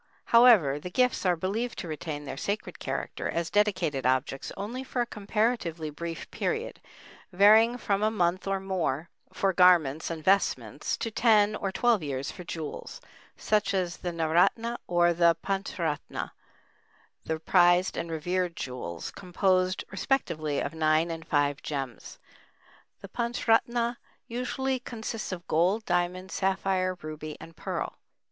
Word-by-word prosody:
However, 220 Hz, -, +6 dB
the 180 Hz, -, -7 dB
gifts 250 Hz, -1 st, +1 dB
are 180 Hz, -, +4 dB
believed 210 Hz, +8 st, -2 dB
to -, -, -5 dB
retain 155 Hz, -1 st, -5 dB
their -, -, -5 dB
sacred 205 Hz, +1 st, -4 dB
character -, -, -3 dB
as 170 Hz, 0 st, -2 dB
dedicated 185 Hz, -10 st, +1 dB
objects 130 Hz, +2 st, 0 dB
only 230 Hz, +7 st, -4 dB
for 255 Hz, -1 st, -4 dB
a 240 Hz, -, +2 dB
comparatively 205 Hz, -7 st, -1 dB
brief 165 Hz, +2 st, -6 dB
period, 455 Hz, +2 st, -3 dB, 0.5 s
varying 215 Hz, +5 st, +6 dB
from 200 Hz, -4 st, 0 dB
a 215 Hz, -, +3 dB
month 185 Hz, -3 st, 0 dB
or 195 Hz, 0 st, 0 dB
more 170 Hz, -5 st, -2 dB, 0.2 s
for 195 Hz, -1 st, 0 dB
garments 170 Hz, -5 st, +4 dB
and 165 Hz, -2 st, -5 dB
vestments, 195 Hz, +3 st, +1 dB
to 225 Hz, -, -3 dB
ten 215 Hz, -2 st, +4 dB
or 195 Hz, -2 st, -2 dB
twelve 230 Hz, 0 st, +2 dB
years 140 Hz, -2 st, -3 dB
for 180 Hz, -, -9 dB
jewels, 160 Hz, -, -6 dB, 0.4 s
such 210 Hz, -2 st, +1 dB
as 180 Hz, -2 st, -1 dB
the 180 Hz, -, -4 dB
naoratna 175 Hz, +9 st, +1 dB
or 175 Hz, 0 st, +3 dB
the 170 Hz, 0 st, +4 dB
panchratna, 190 Hz, -6 st, -3 dB, 0.9 s
the 160 Hz, 0 st, -3 dB
prized 175 Hz, +2 st, +4 dB
and 170 Hz, 0 st, -3 dB
revered 175 Hz, +2 st, -1 dB
jewels, 105 Hz, -11 st, -5 dB
composed 185 Hz, 0 st, 0 dB
respectively 170 Hz, -, -1 dB
of 140 Hz, -, -3 dB
nine 160 Hz, +1 st, +2 dB
and 165 Hz, 0 st, -7 dB
five 145 Hz, -2 st, +1 dB
gems. 135 Hz, -6 st, -5 dB, 0.8 s
The 195 Hz, -, -8 dB
panchratna 235 Hz, +1 st, +1 dB, 0.3 s
usually 255 Hz, +2 st, -2 dB
consists 225 Hz, -3 st, -5 dB
of 175 Hz, -2 st, -6 dB
gold, 185 Hz, +7 st, +2 dB
diamond, 180 Hz, +1 st, -1 dB
sapphire, 190 Hz, -1 st, 0 dB
ruby, 155 Hz, 0 st, -6 dB
and 165 Hz, +1 st, -12 dB
pearl. -, -, -4 dB
180 Hz, 140 wpm, -28 LUFS, 160-210 Hz, 0.9 s, However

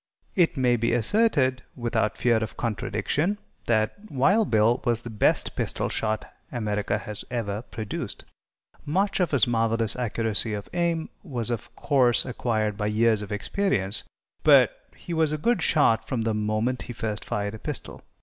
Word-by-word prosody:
It 170 Hz, -5 st, +3 dB
may 125 Hz, -2 st, +3 dB
be 115 Hz, 0 st, +1 dB
asserted, 130 Hz, -, +3 dB
without 115 Hz, -3 st, -1 dB
fear 120 Hz, -2 st, +3 dB
of 110 Hz, 0 st, -4 dB
contradiction, 120 Hz, -, -1 dB, 0.3 s
that 115 Hz, -, 0 dB
Wild 190 Hz, -, +3 dB
Bill 110 Hz, +2 st, +3 dB
was 120 Hz, -2 st, 0 dB
the 120 Hz, -, -7 dB
best 105 Hz, -, +1 dB
pistol -, -, -1 dB
shot 110 Hz, -1 st, -1 dB, 0.3 s
America 105 Hz, -4 st, -1 dB
has 105 Hz, -1 st, -6 dB
ever 110 Hz, -4 st, -2 dB
produced. 110 Hz, -3 st, -6 dB, 0.6 s
Much 195 Hz, +7 st, 0 dB
of 180 Hz, -, +2 dB
his 140 Hz, -4 st, +3 dB
marvelous 115 Hz, -2 st, 0 dB
accuracy 115 Hz, -2 st, 0 dB
of 100 Hz, -, -6 dB
aim 170 Hz, -2 st, 0 dB
was, 125 Hz, -, -3 dB
of 115 Hz, -, -5 dB
course, 125 Hz, -4 st, +3 dB
acquired 110 Hz, -4 st, -1 dB
by 105 Hz, -1 st, -1 dB
years 110 Hz, 0 st, +2 dB
of 105 Hz, -, -7 dB
experience, 105 Hz, -, 0 dB, 0.4 s
but -, -, +6 dB, 0.2 s
he 175 Hz, -, -7 dB
was 160 Hz, -2 st, +2 dB
a -, -, 0 dB
good 220 Hz, +4 st, +1 dB
shot 115 Hz, -9 st, +3 dB
from 120 Hz, -4 st, -1 dB
the 110 Hz, -1 st, 0 dB
moment 110 Hz, +4 st, 0 dB
he 120 Hz, -, -7 dB
first 110 Hz, -2 st, -3 dB
fired 105 Hz, 0 st, -2 dB
a 110 Hz, -, -8 dB
pistol. -, -, -5 dB
115 Hz, 160 wpm, -26 LUFS, 110-140 Hz, 0.6 s, but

